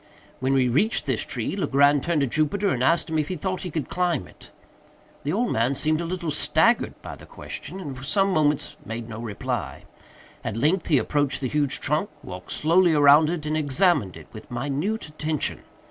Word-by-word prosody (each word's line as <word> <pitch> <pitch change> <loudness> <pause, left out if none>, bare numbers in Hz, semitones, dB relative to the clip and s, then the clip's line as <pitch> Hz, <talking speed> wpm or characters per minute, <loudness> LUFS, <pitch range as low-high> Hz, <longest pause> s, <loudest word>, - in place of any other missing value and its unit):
When 130 +1 0
we 130 -2 +3
reached 155 - +1
this - - 0
tree, - - -3
Legrand 140 -6 +3
turned 170 -4 +1
to - - +3
Jupiter, 155 - 0
and 125 -6 0
asked 165 +4 +2
him 160 -1 -1
if 150 - -1
he 185 - -3
thought 185 +3 -3
he 185 - -5
could 155 -4 -3
climb 175 - 0
it. - - -16 0.7
The 145 - -1
old 230 +7 0
man 120 +5 +1
seemed 155 +3 +1
a - - -3
little 170 -2 -3
staggered 155 +10 +2
by - - -7
the - - -15
question, 190 - -8
and 145 -8 -6
for 130 - -10
some 195 +7 +2
moments 150 -3 +1
made 115 +1 -6
no 110 -1 -7
reply. 110 -3 -4 0.6
At 110 - -4
length 155 +10 +1
he 150 - +4
approached 145 0 0
the 130 - -2
huge 145 -1 +1
trunk, 155 +8 0
walked 90 -1 -8
slowly 170 +2 +3
around 145 +1 +6
it, 165 -3 -3
and 155 0 -1
examined 150 - +1
it - - -12
with - - -11
minute 145 - -2
attention. 155 -1 -2
150 Hz, 200 wpm, -24 LUFS, 135-175 Hz, 0.7 s, around